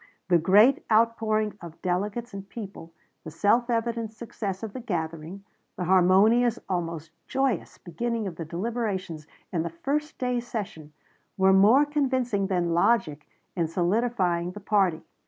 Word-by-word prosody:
The 175 -2 +5
great 205 - +5
outpouring 215 -2 +2
of 170 -2 -10
delegates 205 +6 -2
and 195 0 -8
people, 195 -7 -9 0.3
the 160 - -7
self 230 +9 +2
evident 230 -1 -1
success 215 -3 -6
of 215 -3 -5
the - - -5
gathering, 170 -3 -5 0.3
the - - -4
harmonious, 195 +7 +4
almost 165 -3 -3 0.2
joyous, 265 -8 -1
beginning 230 +5 -3
of 185 -4 -5
the 165 - -6
deliberations 185 -3 -4 0.3
in 170 - +1
the 170 - -3
first 285 - -3
day's 245 -1 -2
session, 195 -10 -6 0.5
were 190 0 +5
more 215 +9 +6
convincing 260 -8 0
than 175 -3 0
logic 170 -5 +1 0.3
in 170 -3 0
solidifying 180 -1 0
the 210 - -8
party. 195 -5 +1
200 Hz, 140 wpm, -26 LUFS, 175-235 Hz, 0.5 s, more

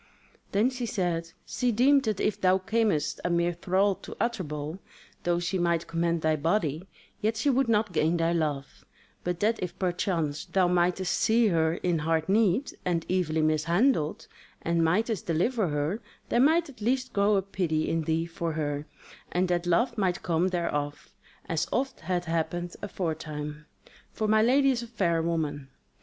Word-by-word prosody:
Then 215 +6 +2
she 250 -2 -4
said: 170 -5 -2
"She 250 -1 0
deemed 270 +5 +4
that 215 -3 -1
if 210 - 0
thou 185 0 +4
camest 205 -4 0
a - - 0
mere 170 0 +1
thrall 190 +4 +1
to - - -10
Utterbol, 160 -8 -3 0.5
though 175 0 +2
she 175 +2 -1
might 170 -1 +1
command 170 0 -1
thy 155 0 +3
body, 165 +1 0 0.3
yet 220 +1 0
she 280 +6 +2
would 265 -1 +1
not 210 -3 +2
gain 165 +2 +2
thy 165 0 +1
love; 150 -5 -2 0.4
but 175 -1 -2
that 220 +2 +2
if 180 0 -4
perchance 175 -5 -1
thou 185 -2 +2
mightest 180 +1 +1
see 225 0 +3
her 160 -2 +2
in 175 -2 0
hard 160 +1 0
need, 210 +5 +2
and 170 -2 -1
evilly 160 -4 +1
mishandled, 160 - +1 0.4
and 170 0 +1
mightest 210 +5 0
deliver 185 +6 +1
her, 150 +8 -1 0.3
there 235 - +2
might 320 +5 +4
at 255 -6 -14
least 255 +3 0
grow 200 0 +3
up 195 +1 -3
pity 160 -4 0
in 165 - 0
thee 160 +1 0
for 170 -1 -4
her, 145 -1 -3 0.4
and 180 +1 +1
that 175 0 0
love 235 +7 +2
might 185 -3 0
come 170 +1 +1
thereof, 145 -5 -3 0.3
as 160 0 -1
oft 270 +1 -1
hath 175 0 -2
happed 170 +1 -2
aforetime; 150 -5 -4 0.4
for 215 - -2
my 215 0 +4
lady 270 +4 +4
is 245 -2 -1
a 235 - -7
fair 175 -8 0
woman. 155 -4 -2
175 Hz, 170 wpm, -28 LUFS, 165-215 Hz, 0.5 s, deemed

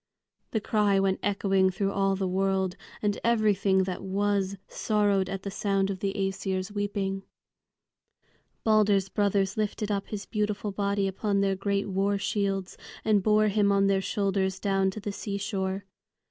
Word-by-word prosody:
the 220 - 0
cry 205 -2 +2
went 195 -1 +1
echoing 195 -1 +2
through 195 +1 -1
all 195 -1 +1
the 190 -1 -1
world, 190 0 0 0.3
and 205 -1 0
everything 205 -4 +3
that 185 -1 -4
was 200 0 0
sorrowed 205 -3 +1
at 195 -1 -4
the 200 - -4
sound 195 -1 0
of 190 - -5
the 195 +1 -1
Æsir's 195 -1 -2
weeping. 200 -1 -2 1.4
Balder's 205 -3 +3
brothers 200 -1 +1
lifted 210 0 -1
up 200 -1 -1
his 205 -2 -5
beautiful 210 -1 -2
body 200 0 0
upon 200 +1 0
their 195 -1 +2
great 200 +1 -1
war 200 +1 +1
shields 195 -2 -2 0.3
and 215 -2 +4
bore 215 +1 +3
him 200 0 +3
on 200 0 +3
their 195 -1 +2
shoulders 195 -1 0
down 195 -1 +1
to 190 - -6
the 205 0 -4
seashore. 200 -1 -3
200 Hz, 155 wpm, -28 LUFS, 195-205 Hz, 1.4 s, and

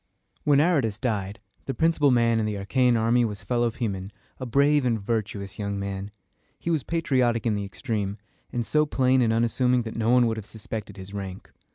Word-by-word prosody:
When 145 -2 +5
Aratus 145 - +2
died, 105 -4 -2 0.3
the 135 - -2
principal 160 -3 +3
man 115 -2 +3
in 110 - 0
the 105 - -2
Achæan 120 +4 +2
army 115 +2 +3
was 105 -4 -3
Phil 120 -1 0
o 120 - +3
poe´men, 100 -5 -4 0.3
a 130 - -4
brave 140 +4 +3
and 115 -3 +1
virtuous 100 -2 -3
young 100 -1 -2
man. 100 0 -4 0.5
He 170 - -3
was 160 -3 +1
patriotic 130 -8 +1
in 115 - +2
the 100 -1 -2
extreme, 100 -1 -3 0.3
and 120 -1 -2
so 150 +5 +2
plain 130 -2 +3
and 115 -2 +3
unassuming 120 +2 +2
that 110 - -7
no 115 0 0
one 125 0 +5
would 115 -1 0
have 110 - -6
suspected 105 -2 -7
his 95 +1 -9
rank. 95 -1 -7
115 Hz, 200 wpm, -26 LUFS, 100-130 Hz, 0.5 s, When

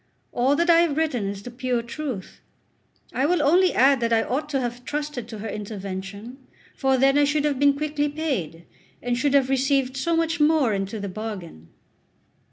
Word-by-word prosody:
All 260 +4 +2
that 340 +3 +1
I 335 -1 +6
have 320 -4 0
written 295 -10 0
is 200 0 -5
the 245 - -8
pure 250 -1 -2
truth. 235 -4 -6 0.7
I 270 +3 +1
will 345 -2 +2
only 355 +6 +4
add 270 +1 +4
that 230 -1 -1
I 225 -1 +3
ought 295 +4 -3
to 275 -2 0
have 245 -1 -4
trusted 295 -5 -4
to 225 - -8
her 215 +2 -6
intervention, 200 +3 -6 0.4
for 265 -1 +2
then 270 +2 +4
I - - +5
should 290 +1 +1
have 285 -3 0
been 285 0 +4
quickly 295 0 -1
paid, 255 - -3 0.4
and 245 0 0
should 280 +3 +1
have 270 -2 +4
received 270 0 +1
so 330 +6 0
much 330 0 0
more 295 -6 +3
into 195 +2 -3
the 200 - -4
bargain. 185 - -7
265 Hz, 190 wpm, -24 LUFS, 225-295 Hz, 0.7 s, I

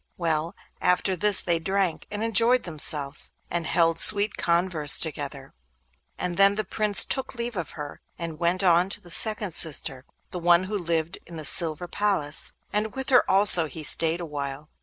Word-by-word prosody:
Well, 165 -1 -2 0.3
after 185 +1 0
this 205 +2 +2
they 170 -2 0
drank, 190 -1 -3
and 205 +1 -5
enjoyed 230 +3 +2
themselves, 150 -3 0 0.2
and 170 -2 -3
held 165 -1 0
sweet 210 0 +2
converse 170 -3 0
together, 140 -3 -4 0.6
and 180 -1 -4
then 200 0 +4
the 215 - -3
Prince 210 +1 +2
took 265 -1 -3
leave 235 -1 -6
of 180 -4 -5
her, 145 -1 -9 0.2
and 165 -2 -8
went 175 +3 -1
on 175 0 +2
to - - -6
the 175 - -15
second 210 -2 +2
sister, 140 -5 -1 0.3
the 180 - -6
one 175 +1 +2
who 200 +3 -6
lived 165 -1 -3
in 170 -1 -10
the 155 - -7
silver 165 +3 +4
palace, 180 -7 -1 0.2
and 210 +3 -2
with 265 -1 -5
her 250 -2 +4
also 190 -4 +6
he 155 +1 -7
stayed 165 +2 +4
awhile. 145 -2 -7
175 Hz, 175 wpm, -24 LUFS, 160-200 Hz, 0.6 s, also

